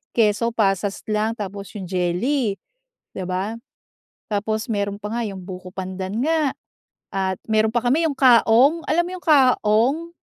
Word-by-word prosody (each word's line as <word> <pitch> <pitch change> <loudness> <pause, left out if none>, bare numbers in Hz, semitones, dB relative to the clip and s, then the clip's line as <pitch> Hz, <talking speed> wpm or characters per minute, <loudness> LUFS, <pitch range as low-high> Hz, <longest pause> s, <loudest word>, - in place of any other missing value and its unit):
Keso, 225 0 +2
pasas 195 -1 0
lang 215 +1 0
tapos 200 -1 -6
yung 195 -3 -5
jelly, 195 +7 0 0.6
'di 185 - -5
ba? 190 +4 -2 0.8
Tapos 215 +1 -1
meron 200 -2 -1
pa 210 0 -6
nga 240 - -1
yung 195 -2 -7
buko 185 0 -8
pandan 190 +2 -4
nga 310 -2 +1 0.6
at 190 -1 -1
meron 220 0 +2
pa 240 - +1
kami 295 +7 +3
yung 285 - -4
kaong, 255 +4 +5
alam 340 +3 +2
yung 365 0 -7
kaong? 265 +1 +3
215 Hz, 145 wpm, -22 LUFS, 195-255 Hz, 0.8 s, kaong